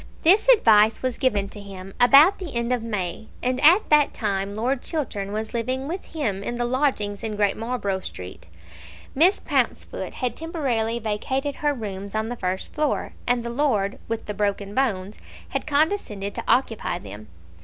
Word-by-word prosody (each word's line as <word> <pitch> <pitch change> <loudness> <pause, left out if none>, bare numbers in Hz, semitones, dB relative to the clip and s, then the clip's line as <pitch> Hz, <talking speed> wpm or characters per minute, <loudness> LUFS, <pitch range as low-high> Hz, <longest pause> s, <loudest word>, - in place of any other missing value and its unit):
This 400 +8 +5
advice 220 - +5
was 255 -2 -2
given 210 -7 +1
to 205 - -10
him 195 -1 -10
about 280 +10 +7
the 335 -9 -7
end 235 +1 0
of 250 -2 +1
May, 210 -2 -4 0.2
and 255 +2 0
at 350 +8 +6
that 300 -1 +4
time 200 -2 -2
Lord 245 +4 -1
Chiltern 210 - -3
was 215 +1 -4
living 255 +3 -2
with 355 +5 -5
him 220 -12 -3
in 240 +4 -4
the 240 0 -1
lodgings 240 -6 0
in 220 -2 -3
Great 205 -1 +1
Marlborough 225 -4 -2
Street. 90 - -9 0.7
Miss 345 +8 +5
Pouncefoot - - -2
had 250 -2 -2
temporarily 260 -9 -1
vacated 260 +6 -2
her 295 -1 +1
rooms 200 -3 -6
on 220 +1 -1
the 245 - -3
first 185 -3 -4
floor, 300 -2 -1
and 245 -1 +2
the 235 - -4
Lord 230 -7 0
with 230 -1 -3
the 210 - -4
broken 200 0 -2
bones 210 -6 -1 0.3
had - - -3
condescended 285 - 0
to - - -5
occupy 225 -8 +1
them. 105 -10 -10
230 Hz, 175 wpm, -24 LUFS, 205-270 Hz, 0.7 s, about